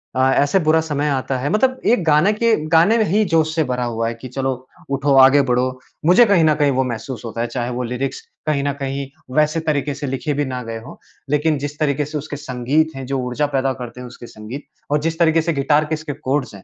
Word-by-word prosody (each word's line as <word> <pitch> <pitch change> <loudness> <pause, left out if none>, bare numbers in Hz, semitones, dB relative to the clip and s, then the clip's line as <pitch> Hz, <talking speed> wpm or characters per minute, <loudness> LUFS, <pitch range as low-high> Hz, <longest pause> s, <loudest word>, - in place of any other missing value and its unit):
अ, - - -1
ऐसे 145 +9 +3
बुरा 155 +1 +4
समय 150 -2 -2
आता 135 -1 -1
है 140 +3 -2
मतलब 255 - +1
एक 220 -4 +3
गाने 155 +5 +4
के 230 +1 +2
गाने 180 +8 +4
ही 210 +5 +2
जोश 160 -1 +2
से 160 - +2
भरा 125 -2 -2
हुआ 115 -1 -2
है 115 - -2
कि 130 - -6
चलो, 130 0 -3 0.2
उठो 140 +1 +1
आगे 135 +2 +7
बढ़ो। 130 +1 0 0.3
मुझे 180 +8 +7
कहीं 200 -6 +4
न 155 -1 +4
कहीं 145 -2 +2
वो 130 0 +1
महसूस 120 0 -5
होता 115 0 -4
है, 120 - -1
चाहे 120 0 -3
वो 125 +1 -3
लिरिक्स 125 +3 -3 0.3
कहीं 145 -2 +1
न 145 - 0
कहीं 135 0 -3 0.3
वैसे 155 +2 +2
तरीके 150 -3 -1
से 140 +1 -5
लिखे 135 +3 -2
भी 145 +1 -1
ना 130 -1 -4
गए 115 -1 -5
हों। - - -10 0.3
लेकिन 150 +1 +1
जिस 145 +1 -5
तरीके 150 -1 0
से 150 +2 -5
उसके 150 0 -6
संगीत 145 +3 -1
हैं, 135 -1 -6
जो 135 +1 -2
ऊर्जा 125 +3 -1
पैदा 135 -1 0
करते 125 -1 -9
हैं 125 - -7
उसके 120 0 -11
संगीत 115 +8 -9 0.3
और 150 - +3
जिस 165 +1 -2
तरीके 165 -1 +4
से 165 +1 -1
गिटार 145 +2 +2
के 155 - -4
इसके 155 -1 -6
कॉर्ड्स 130 -5 -2
हैं, 95 - -13
140 Hz, 240 wpm, -20 LUFS, 130-155 Hz, 0.3 s, आगे